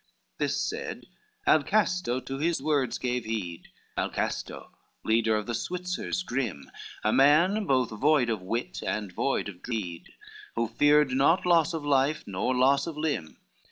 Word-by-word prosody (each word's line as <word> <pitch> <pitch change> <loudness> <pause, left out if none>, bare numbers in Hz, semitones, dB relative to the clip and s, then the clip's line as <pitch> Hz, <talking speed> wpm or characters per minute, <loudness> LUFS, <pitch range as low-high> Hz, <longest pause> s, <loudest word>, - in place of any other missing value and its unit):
XXIV - - -43
This - - 0
said, - - -5 0.4
Alcasto 180 - +2
to 135 - -4
his 170 +2 +1
words 145 -2 0
gave 125 -1 -2
heed, 95 -6 -4 0.3
Alcasto - - -3 0.3
leader 110 0 +2
of 105 -1 -2
the 120 - -3
Switzers 180 +6 -3
grim, 115 - -3 0.3
A 110 - +2
man 170 +10 +4
both 130 -3 +2
void 130 +2 +2
of 110 -4 -2
wit 115 +6 -3
and 105 -3 -3
void 135 +7 -1
of 90 -3 -9
dreed, 95 -8 -5 0.4
Who 115 0 0
feared 145 +3 +4
not 140 +8 +3
loss 165 -2 +3
of 155 -2 -5
life 140 +1 +2
nor 100 +6 -1
loss 140 +4 +3
of 160 -3 -6
limb. 145 - -2
130 Hz, 155 wpm, -28 LUFS, 110-155 Hz, 0.4 s, man